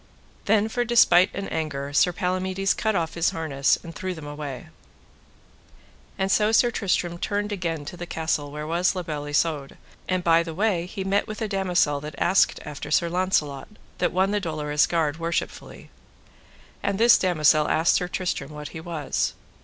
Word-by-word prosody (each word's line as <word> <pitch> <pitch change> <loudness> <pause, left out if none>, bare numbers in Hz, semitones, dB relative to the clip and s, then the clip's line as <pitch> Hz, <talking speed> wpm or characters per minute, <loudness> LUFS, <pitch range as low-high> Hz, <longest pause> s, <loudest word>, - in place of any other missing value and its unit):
Then 215 +1 +3
for 245 +2 -1
despite 225 -6 +5
and 200 - -4
anger 145 -3 -3
Sir 180 +4 +4
Palamides 185 +2 -1
cut 220 -2 -1
off 165 -3 -1
his 170 -1 +1
harness, 145 -4 +1
and 165 - -9
threw 185 +1 -4
them 160 -2 -9
away. 145 -3 -7 1.5
And 190 0 0
so 210 +1 +3
Sir 240 +2 +4
Tristram 175 -5 -1
turned 205 +2 -2
again 165 -6 -3
to 145 - -7
the 175 0 -7
castle 160 -3 -2
where 150 +1 -6
was 175 +4 +1
La 180 - -3
Beale 150 -3 -5
Isoud; 145 -1 -1 0.3
and 185 -1 0
by 165 -1 +5
the 165 -1 -6
way 185 -3 0
he 195 +1 -5
met 195 +1 0
with 215 - -6
a 220 - -2
damosel 180 -7 +1
that 150 +1 -7
asked 185 +2 +3
after 150 -2 -7
Sir 170 - +2
Launcelot, 165 -6 0 0.3
that - - +1
won 190 +2 +1
the 210 - +1
Dolorous 150 -4 0
Guard 160 -2 0
worshipfully; 165 +1 -4 0.9
and 200 -1 -1
this 235 +1 +6
damosel 155 -4 +3
asked 160 +2 +3
Sir 180 - +1
Tristram 175 -6 -3
what 150 0 -8
he 160 - -8
was. 160 -3 -2
170 Hz, 175 wpm, -24 LUFS, 150-190 Hz, 1.5 s, this